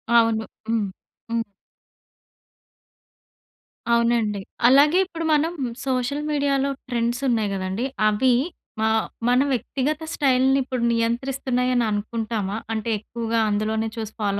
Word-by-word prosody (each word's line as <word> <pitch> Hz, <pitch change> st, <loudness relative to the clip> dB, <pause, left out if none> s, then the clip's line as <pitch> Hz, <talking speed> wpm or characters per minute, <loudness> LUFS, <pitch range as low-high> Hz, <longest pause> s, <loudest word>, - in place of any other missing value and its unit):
అవును. 225 Hz, -1 st, +4 dB, 0.3 s
హ్మ్. 220 Hz, -3 st, +1 dB, 0.4 s
హ్మ్. 230 Hz, 0 st, 0 dB, 2.5 s
అవునండి. 230 Hz, -3 st, +2 dB, 0.3 s
అలాగే 290 Hz, +7 st, +6 dB
ఇప్పుడు 330 Hz, -3 st, -5 dB
మనం 310 Hz, +3 st, +2 dB, 0.4 s
సోషల్ 260 Hz, +3 st, 0 dB
మీడియాలో 280 Hz, -1 st, +1 dB, 0.2 s
ట్రెండ్సున్నాయి 235 Hz, -2 st, 0 dB
గదండీ! 190 Hz, +5 st, -2 dB, 0.2 s
అవి 245 Hz, +4 st, +3 dB, 0.5 s
మా 220 Hz, -, +3 dB, 0.4 s
మన 250 Hz, +1 st, +4 dB
వ్యక్తిగత 275 Hz, +6 st, -1 dB
స్టైల్‌ని 265 Hz, -1 st, +3 dB
ఇప్పుడు 255 Hz, -2 st, -3 dB
నియంత్రిస్తున్నాయని 250 Hz, +1 st, 0 dB
అనుకుంటామా? 215 Hz, -1 st, -2 dB, 0.2 s
అంటే 220 Hz, +1 st, -2 dB
ఎక్కువగా 230 Hz, +1 st, -2 dB
అందులోనే 220 Hz, +2 st, 0 dB
చూసి 220 Hz, -1 st, -5 dB
ఫాలో 200 Hz, -1 st, 0 dB
235 Hz, 100 wpm, -23 LUFS, 220-265 Hz, 2.5 s, అలాగే